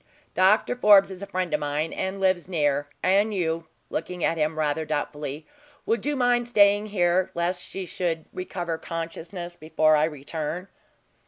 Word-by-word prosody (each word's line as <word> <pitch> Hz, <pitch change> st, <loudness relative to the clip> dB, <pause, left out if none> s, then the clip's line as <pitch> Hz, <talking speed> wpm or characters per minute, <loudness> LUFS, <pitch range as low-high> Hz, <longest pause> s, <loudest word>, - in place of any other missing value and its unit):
Doctor 205 Hz, +6 st, +3 dB
Forbes 205 Hz, -5 st, +6 dB
is 185 Hz, 0 st, -8 dB
a 200 Hz, -, -6 dB
friend 185 Hz, -1 st, -2 dB
of -, -, +2 dB
mine, 150 Hz, +2 st, -2 dB
and 190 Hz, +1 st, -3 dB
lives 185 Hz, -2 st, +1 dB
near; 145 Hz, -4 st, +1 dB, 0.2 s
and 200 Hz, +4 st, +3 dB
you," 165 Hz, -2 st, -1 dB, 0.2 s
looking 180 Hz, +2 st, -4 dB
at -, -, +2 dB
him 155 Hz, 0 st, -1 dB
rather 155 Hz, 0 st, 0 dB
doubtfully, 150 Hz, 0 st, -4 dB, 0.4 s
"would 230 Hz, +4 st, 0 dB
you 295 Hz, -, +1 dB
mind 245 Hz, -2 st, +2 dB
staying 205 Hz, -2 st, +4 dB
here, 185 Hz, -2 st, +2 dB
lest 175 Hz, +1 st, -1 dB
she 190 Hz, 0 st, -6 dB
should 170 Hz, -2 st, -2 dB
recover 175 Hz, -3 st, -4 dB
consciousness 165 Hz, +1 st, -6 dB
before 155 Hz, -1 st, +2 dB
I 150 Hz, 0 st, +4 dB
return?" 160 Hz, +4 st, -5 dB
175 Hz, 160 wpm, -25 LUFS, 155-195 Hz, 0.4 s, Forbes